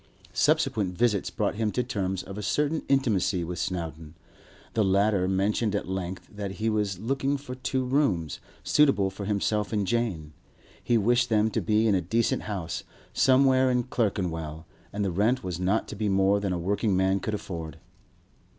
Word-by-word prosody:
Subsequent 95 Hz, -5 st, +1 dB
visits 110 Hz, -5 st, +1 dB
brought -, -, -1 dB
him 110 Hz, -1 st, 0 dB
to 125 Hz, -, 0 dB
terms 95 Hz, -6 st, -2 dB
of 95 Hz, -, -8 dB
a 105 Hz, -, -5 dB
certain 150 Hz, +9 st, 0 dB
intimacy 105 Hz, -9 st, +2 dB
with 85 Hz, +1 st, -5 dB
Snowdon. 80 Hz, -3 st, -4 dB, 0.6 s
The 110 Hz, -, +2 dB
latter 100 Hz, -1 st, +2 dB
mentioned 100 Hz, +3 st, +1 dB
at 100 Hz, -, -2 dB
length 95 Hz, -1 st, -4 dB
that 100 Hz, -2 st, -4 dB
he 110 Hz, +4 st, -1 dB
was 105 Hz, -3 st, 0 dB
looking 135 Hz, +6 st, -1 dB
for 135 Hz, -2 st, -8 dB
two 130 Hz, 0 st, -2 dB
rooms, 125 Hz, -, 0 dB, 0.2 s
suitable 135 Hz, -10 st, +3 dB
for 100 Hz, +1 st, -6 dB
himself 105 Hz, +1 st, 0 dB
and 105 Hz, -3 st, 0 dB
Jane. 95 Hz, -9 st, -1 dB, 0.5 s
He 120 Hz, -, +3 dB
wished 120 Hz, +3 st, +2 dB
them 110 Hz, 0 st, +2 dB
to -, -, 0 dB
be 110 Hz, +1 st, +2 dB
in 105 Hz, -, +3 dB
a 95 Hz, -, +2 dB
decent 115 Hz, +7 st, 0 dB
house, 85 Hz, -4 st, -4 dB, 0.3 s
somewhere 130 Hz, 0 st, +4 dB
in 125 Hz, -1 st, +2 dB
Clerkenwell, 85 Hz, -10 st, -2 dB, 0.3 s
and 100 Hz, 0 st, -2 dB
the 95 Hz, -, 0 dB
rent 110 Hz, +8 st, +1 dB
was 90 Hz, -2 st, -4 dB
not 95 Hz, +4 st, +1 dB
to -, -, -6 dB
be 105 Hz, 0 st, -1 dB
more 95 Hz, +1 st, +3 dB
than 100 Hz, -2 st, -2 dB
a 90 Hz, -, 0 dB
working 100 Hz, +3 st, 0 dB
man 95 Hz, +1 st, +2 dB
could 105 Hz, +2 st, -2 dB
afford. 80 Hz, -6 st, -6 dB
100 Hz, 180 wpm, -27 LUFS, 95-115 Hz, 0.6 s, somewhere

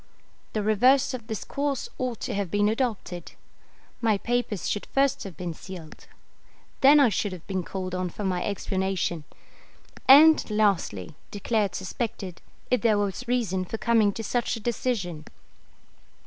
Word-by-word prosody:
The 215 Hz, -, -1 dB
reverse 250 Hz, +7 st, +4 dB
of 235 Hz, -3 st, -6 dB
this 220 Hz, -3 st, -4 dB
course 280 Hz, -2 st, -2 dB
ought 250 Hz, -3 st, -2 dB
to -, -, -3 dB
have 200 Hz, -3 st, -2 dB
been 205 Hz, +3 st, +2 dB
adopted. 215 Hz, -7 st, -3 dB, 0.7 s
My 220 Hz, -3 st, +3 dB
papers 230 Hz, -4 st, -2 dB
should 205 Hz, -, -2 dB
first 275 Hz, 0 st, +1 dB
have 185 Hz, -6 st, -8 dB
been 175 Hz, -2 st, -4 dB
sealed; 170 Hz, -2 st, -11 dB, 0.7 s
then 285 Hz, +2 st, +7 dB
I 275 Hz, -4 st, +6 dB
should 205 Hz, -1 st, -1 dB
have 175 Hz, -3 st, -10 dB
been 190 Hz, -2 st, -2 dB
called 185 Hz, 0 st, -5 dB
on 185 Hz, 0 st, -1 dB
for 205 Hz, -, -7 dB
my 185 Hz, -2 st, 0 dB
explanation; 190 Hz, -5 st, -2 dB, 0.8 s
and, 305 Hz, +4 st, +8 dB
lastly, 200 Hz, -, 0 dB, 0.2 s
declared 205 Hz, -2 st, -1 dB
suspected, 190 Hz, -2 st, -5 dB, 0.3 s
if 250 Hz, -, +3 dB
there 220 Hz, -3 st, +3 dB
was 205 Hz, +4 st, -2 dB
reason 225 Hz, -7 st, 0 dB
for 205 Hz, +5 st, -5 dB
coming 225 Hz, -3 st, +3 dB
to 225 Hz, -, -5 dB
such 245 Hz, +2 st, -1 dB
a -, -, -6 dB
decision. 205 Hz, -9 st, -2 dB
210 Hz, 150 wpm, -26 LUFS, 185-240 Hz, 0.8 s, and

